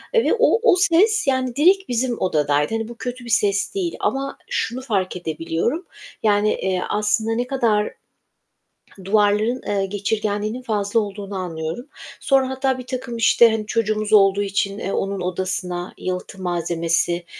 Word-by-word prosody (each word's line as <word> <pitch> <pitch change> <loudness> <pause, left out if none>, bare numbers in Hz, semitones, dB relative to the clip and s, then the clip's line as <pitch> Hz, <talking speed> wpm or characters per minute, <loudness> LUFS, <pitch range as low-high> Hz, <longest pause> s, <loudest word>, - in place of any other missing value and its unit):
ve 460 - +4
o 475 -1 +4
o - - +4
ses 400 +2 +3
yani 260 -2 0
direkt 380 +6 +3
bizim 245 0 -1
odadaydı. 150 -1 +1
Hani 225 0 -2
bu 235 - -8
kötü 245 0 -6
bir - - -8
ses 205 - +1
değil 360 -4 -2
ama 275 +1 -2
şunu 260 - -2
fark 200 -9 -1
edebiliyorum. 170 - -2 0.4
Yani, 210 0 +3
eee, 185 -1 -1
aslında 215 +2 0
ne 245 +2 -1
kadar 230 -6 +1 1.1
duvarların, 210 +4 +2
eee, 200 -1 0
geçirgenliğinin 210 +3 -2
fazla 210 -2 0
olduğunu 200 -1 -6
anlıyorum. 165 +4 -4 0.4
Sonra 270 -2 +2
hatta 265 0 0
birtakım 255 -1 -5
işte, 230 0 +5
hani, 220 -1 -2
çocuğumuz 215 -1 -1
olduğu 200 -1 +5
için, 200 0 -1
eee, 195 - -3
onun 195 -1 -2
odasına 180 0 -3
yalıtım 185 +1 -5
malzemesi 170 0 0
210 Hz, 145 wpm, -21 LUFS, 190-250 Hz, 1.1 s, işte